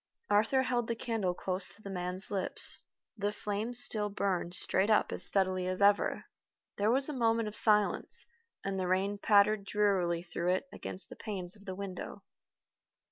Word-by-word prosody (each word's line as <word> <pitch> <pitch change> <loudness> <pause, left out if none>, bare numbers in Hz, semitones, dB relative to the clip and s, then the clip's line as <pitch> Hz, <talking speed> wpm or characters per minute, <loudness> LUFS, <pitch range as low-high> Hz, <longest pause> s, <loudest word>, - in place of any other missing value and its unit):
Arthur 225 +6 +2
held 245 -2 -2
the 230 - -2
candle 220 -6 -3
close 185 +1 -2
to - - -20
the 200 - -8
man's 180 +1 -3
lips. 195 -2 -1 0.4
The 205 -1 -2
flame 210 +3 -5
still 215 -3 +4
burned 185 -3 -3
straight 190 +3 +1
up 215 - +2
as - - +1
steadily 185 -2 +4
as 185 0 -3
ever. 205 0 +2 0.5
There 205 +1 0
was 265 +3 +2
a 300 - -5
moment 230 -3 0
of 210 - -7
silence, 210 -2 +5 0.4
and 195 -1 -3
the 185 - -2
rain 195 +2 -1
pattered 205 0 +3
drearily 190 -4 0
through 175 0 -2
it 185 +9 -3
against 185 - -5
the - - -11
panes 190 -3 -7
of 200 -1 -19
the 190 -2 -6
window. 195 -2 -8
200 Hz, 175 wpm, -30 LUFS, 185-215 Hz, 0.5 s, silence